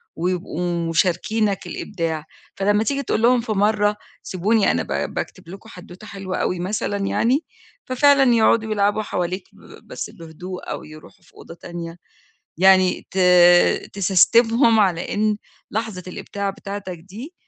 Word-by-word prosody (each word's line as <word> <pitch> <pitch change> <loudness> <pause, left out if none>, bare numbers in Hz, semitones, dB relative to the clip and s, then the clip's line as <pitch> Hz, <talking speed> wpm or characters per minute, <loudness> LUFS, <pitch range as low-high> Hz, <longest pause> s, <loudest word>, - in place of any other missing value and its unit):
ويبقوا 175 -1 -2
مشاركينك 190 +5 0
الإبداع، 165 -5 -4 0.3
فلما 205 +2 +1
تيجي 280 +4 -1
تقول 225 - -1
لهم 245 +1 +4
في 230 - -5
مَرة 210 0 +1 0.3
سيبوني 205 +3 +1
أنا - - -1
ب - - -3
باكتب - - -6
لكم 195 +5 -11
حدوتة 180 +1 -12
حلوة 195 -2 -5
أوي 180 - -1
مثلًا 200 +2 -2
يعني، 235 +8 +1 0.4
ففعلًا 270 0 +4
يقعدوا 220 -1 +3
يلعبوا 205 0 +1
حواليك 180 -1 -3
ب - - -17
بس - - -6
بهدوء 175 +2 -9
أو - - -5
يروحوا 155 +5 -15
في - - -25
أوضة - - -12
تانية، 170 -1 -8 0.6
يعني 185 0 +4
ت 190 - -5 0.7
تسستمهم 225 +5 +4
على 180 -4 0
إن 215 0 +1 0.3
لحظة 220 -4 -4
الإبداع 200 +2 -4
بتاعتك 195 -2 -7
دي 210 - -11
195 Hz, 135 wpm, -21 LUFS, 180-220 Hz, 0.7 s, لهم